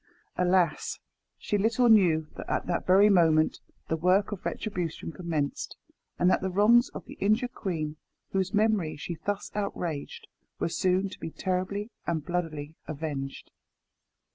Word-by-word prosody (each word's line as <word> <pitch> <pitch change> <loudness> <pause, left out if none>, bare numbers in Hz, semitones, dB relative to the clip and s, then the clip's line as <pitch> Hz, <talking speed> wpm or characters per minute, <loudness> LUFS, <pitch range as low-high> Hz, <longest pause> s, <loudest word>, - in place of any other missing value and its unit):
Alas! 180 -3 +2 0.4
she 205 - -1
little 230 +4 +3
knew 175 -8 +5
that - - -8
at - - 0
that 175 - -2
very 195 +3 +7
moment 160 -5 +4 0.3
the 160 - 0
work 185 +6 +2
of 205 - -5
retribution 175 -6 -3
commenced, 155 -3 -3 0.4
and 175 - +3
that 185 - +4
the 190 - -1
wrongs 220 +6 +5
of - - -7
the - - -10
injured 225 +5 +2
queen, 155 -9 -3 0.3
whose 190 -1 0
memory 210 -6 +2
she 170 - -5
thus 205 -1 -2
outraged, 175 -7 -4 0.3
were - - -1
soon 185 +3 +1
to 190 - -10
be - - -5
terribly 190 +5 -2 0.2
and 160 -3 -1
bloodily 160 -4 -3
avenged. 145 -3 -5
180 Hz, 145 wpm, -28 LUFS, 160-205 Hz, 0.4 s, very